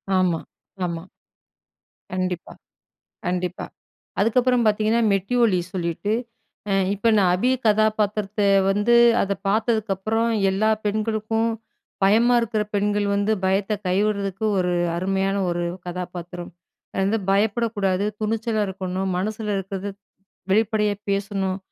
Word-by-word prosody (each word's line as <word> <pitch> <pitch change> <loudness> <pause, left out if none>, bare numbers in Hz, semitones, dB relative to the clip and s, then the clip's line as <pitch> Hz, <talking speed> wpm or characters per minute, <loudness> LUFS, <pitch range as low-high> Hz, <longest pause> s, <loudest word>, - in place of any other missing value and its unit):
ஆமா, 180 -3 +2 0.5
ஆமா. 170 -1 -4 1.1
கண்டிப்பா. 185 -1 -3 0.7
கண்டிப்பா. 180 0 -2 0.6
அதுக்கப்பறம் 245 +3 +3
பாத்தீங்கன்னா, 215 +2 +2
மெட்டி 195 +5 -1
ஒலி 195 -5 +3
சொல்லிட்டு, 180 +3 -2 0.6
அ - - +2 0.2
இப்ப 205 +3 +1
நான் 185 -3 +4
அபி 240 +8 +1 0.2
கதாபாத்திரத்த 210 -1 +1 0.3
வந்து 205 +4 +2 0.3
அத 200 - -1 0.2
பாத்ததுக்கப்பறம், 220 +1 0 0.2
எல்லா 210 +3 +2 0.2
பெண்களுக்கும், 220 +1 0 0.5
பயமா 230 +5 +4
இருக்குற 220 -2 -1
பெண்கள் 205 0 +1
வந்து 205 +2 +1
பயத்த 195 +2 +1
கைவிடுறதுக்கு 200 +1 0
ஒரு 180 -1 +1 0.2
அருமையான 195 +2 0
ஒரு 175 0 -1 0.2
கதாபாத்திரம். 175 0 -6 0.4
அது - - -1
வந்து 220 +2 +1
பயப்படக்கூடாது, 205 -2 +1 0.2
துணிச்சலா 220 0 0
இருக்கணும், 190 0 -3
மனசுல 215 +2 -3
இருக்குறத 195 +1 -5 0.6
வெளிப்படையா 210 0 +2 0.2
பேசணும். 195 -1 -1
205 Hz, 105 wpm, -23 LUFS, 190-220 Hz, 1.1 s, நான்